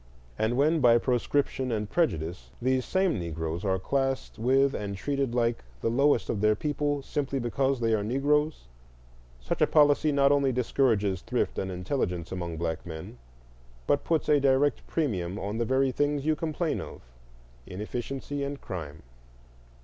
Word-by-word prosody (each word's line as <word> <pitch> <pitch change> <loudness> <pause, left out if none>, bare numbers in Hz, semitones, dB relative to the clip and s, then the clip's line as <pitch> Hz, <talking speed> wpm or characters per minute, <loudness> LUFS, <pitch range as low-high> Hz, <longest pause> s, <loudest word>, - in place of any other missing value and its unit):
And 115 +3 +1
when, 155 +4 +3
by 120 -4 +6
proscription 130 +1 0
and 105 -2 -1
prejudice, 85 - -1
these 130 +1 +1
same 185 - +1
Negroes 80 +1 -4
are 95 -2 +1
classed 135 +6 -2
with 135 +4 +3
and 100 -1 -4
treated 140 +1 -1
like 120 - +1 0.2
the 115 - 0
lowest 140 +4 +3
of 100 - -2
their 105 0 +4
people, 145 +2 -1
simply 140 -1 -2
because 130 +2 0
they 115 -1 +1
are 105 -2 +1
Negroes, 145 - +1 0.8
such - - -4
a - - +5
policy 150 0 +4
not 140 -1 +4
only 140 -2 +3
discourages 115 -6 +1
thrift 120 +2 -1
and 95 - -3
intelligence 90 - -2
among 85 -3 -4
black 80 0 -2
men, 80 -7 -8 0.7
but 145 - +2
puts 165 -2 0
a 150 -1 +5
direct 140 +1 +2
premium 100 - -1
on 105 +2 -3
the 115 - +1
very 130 +2 +2
things 145 +1 0
you 155 0 +2
complain 160 +1 -2
of,—inefficiency - - -7
and 140 0 -4
crime. 75 -4 -7
125 Hz, 155 wpm, -28 LUFS, 95-140 Hz, 0.8 s, by